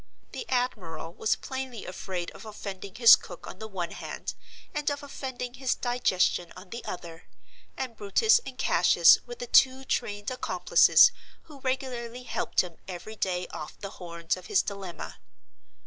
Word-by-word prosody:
The 465 - -7
admiral 175 -11 -2
was 215 - +1
plainly 260 -4 -6
afraid 185 -1 -5
of - - -12
offending 200 -3 -7
his 230 0 +10
cook 175 - -11
on 185 - -9
the 220 - -6
one 180 -5 -4
hand, - - -6 0.4
and 295 -1 0
of 285 0 -4
offending 260 -3 -5
his 260 0 0
digestion 190 -8 +1
on 185 0 -13
the 235 - -6
other—and 180 +8 -9
Brutus 220 - +4
and 255 - -9
Cassius 170 -6 +6
were 240 - -6
the 245 - -6
two 260 +2 +5
trained 205 -2 -2
accomplices 255 - +5 0.3
who 295 -3 -14
regularly 250 -2 -3
helped - - 0
him 175 -3 -9
every 190 +4 -7
day 180 -3 -1
off 150 - -7
the 195 - -6
horns 170 -1 -2
of 185 -1 -11
his 190 - +3
dilemma. 195 -4 -7
215 Hz, 155 wpm, -28 LUFS, 180-255 Hz, 0.4 s, his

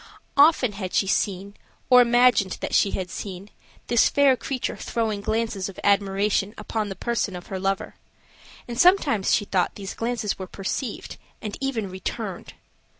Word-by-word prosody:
Often 285 -5 +5
had 195 -3 -5
she - - +3
seen, 195 0 -1 0.3
or 250 -1 +8
imagined 240 -5 +3
that - - -5
she 200 - +4
had 185 -2 -4
seen, 195 0 -7 0.3
this 240 -1 +4
fair 280 -2 +4
creature 255 0 -3
throwing 220 -4 -2
glances 220 -3 -2
of 195 - -11
admiration 200 +1 +1
upon 210 0 -3
the 195 - -5
person 230 -2 -2
of 175 - -8
her 190 - -2
lover, 195 0 -2 0.7
and 240 0 -5
sometimes 300 - +4
she 205 - +2
thought 185 -3 0
these 195 -1 -6
glances 230 -4 -2
were 190 - -5
perceived, 205 +5 -5 0.2
and 210 -2 -5
even 250 -7 -2
returned. 185 0 -6
210 Hz, 155 wpm, -24 LUFS, 195-240 Hz, 0.7 s, or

